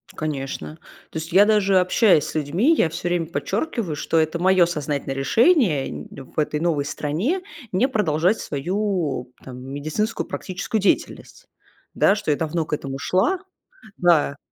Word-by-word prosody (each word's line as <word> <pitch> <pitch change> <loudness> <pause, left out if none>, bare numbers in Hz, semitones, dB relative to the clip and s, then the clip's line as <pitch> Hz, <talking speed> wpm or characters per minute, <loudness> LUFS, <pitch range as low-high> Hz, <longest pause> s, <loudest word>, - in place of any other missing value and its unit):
Конечно. 150 0 -4 0.4
То - - -5
есть 165 +2 -7
я 200 +2 +7
даже 200 -3 +3
общаясь 180 -3 +4
с 150 - -8
людьми, 170 - +2
я 175 - +3
всё 175 +2 -4
время 175 -2 0
подчеркиваю, 170 - -3
что 165 +2 -1
это 160 +1 +1
мое 185 -1 +4
сознательное 145 -4 -3
решение 185 - +3
нь 75 0 -7
в 135 +3 -7
этой 150 0 0
новой 155 -5 0
стране 185 - -2 0.3
не 240 +8 +3
продолжать 185 - +1
свою 160 -5 -2
там 125 -1 -9
медицинскую 150 - -3
практическую 195 +4 -3
деятельность, - - -1 0.5
да. 200 - +4
Что 180 -7 -2
я 145 - +1
давно 160 0 -1
к - - -6
этому 135 -2 -3
шла, 195 - +1 0.6
да. 155 -5 +3
165 Hz, 155 wpm, -22 LUFS, 145-200 Hz, 0.6 s, я